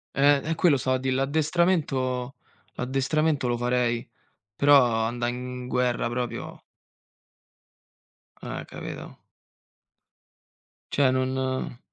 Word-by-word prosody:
Eh, 140 0 +4
e 160 - -1
quello 160 -4 +3
stavo 130 0 0
a - - -8
dì 130 0 -2
l'addestramento 135 -3 0 0.4
l'addestramento 135 +2 0
lo 120 -1 0
farei, 120 -1 0 0.5
però 145 0 +6 0.3
andà 120 +1 -2
in 125 0 -5
guerra 125 -2 0
proprio 120 0 -4 1.8
Eh, - - -6
capito? - - -8 1.7
Cioè 140 -2 +3
non 130 -1 -1
130 Hz, 95 wpm, -26 LUFS, 125-140 Hz, 1.8 s, però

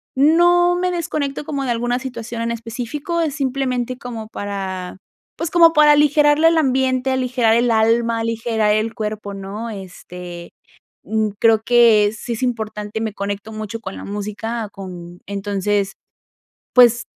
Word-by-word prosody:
no 350 +5 +4
me 365 0 0
desconecto 305 -5 -3
como 280 -3 -3
de 245 - 0
alguna 240 +1 -1
situación 240 -3 -6
en 235 - -1
específico, 240 +9 -4
es 305 -4 -1
simplemente 255 -3 -2
como 235 -4 -7
para, 190 -3 -5 0.4
pues, 335 -1 -3
como 335 -1 +6
para 300 0 +6
aligerarle 295 +1 +4
el 330 - +2
ambiente, 265 -2 +1
aligerar 250 -3 +2
el 240 +1 +2
alma, 230 +1 +2
aligerar 225 -2 0
el 220 +1 -1
cuerpo, 210 -1 -4
¿no? 200 +4 -6
Este, 180 -3 -9 0.5
mm, 215 +1 0
creo 225 -1 +5
que 230 -4 +5
sí 235 - -5
es 225 - -7
importante, 215 -3 -3
me 220 -2 -2
conecto 200 +2 -5
mucho 215 +1 -5
con 195 -3 -7
la - - -8
música, 210 +2 -4
con 180 -2 -9
entonces, 200 0 -1 0.8
pues, 240 -1 +6
230 Hz, 145 wpm, -20 LUFS, 210-265 Hz, 0.8 s, como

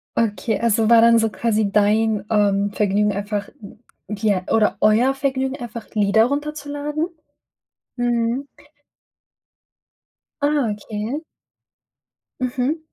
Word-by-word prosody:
Okay, 220 -1 0
also 225 -1 +2
war 230 -1 +7
dann 230 0 +6
so 225 0 +1
quasi 215 0 0
dein, 210 0 +2
ähm, 205 -1 +2
Vergnügen 205 0 +1
einfach 205 +1 -3 0.6
ja 205 -3 0
oder 215 -1 +2
euer 225 +5 +4
Vergnügen, 265 0 -2
einfach 235 -4 -8
Lieder 210 +1 +3
runterzuladen? 295 +2 -3 0.9
Mhm. 240 +2 0 2.0
Ah, 285 -4 +1
okay. 210 +5 -4 1.2
Mhm. 255 +4 -1
225 Hz, 95 wpm, -21 LUFS, 210-260 Hz, 2.0 s, war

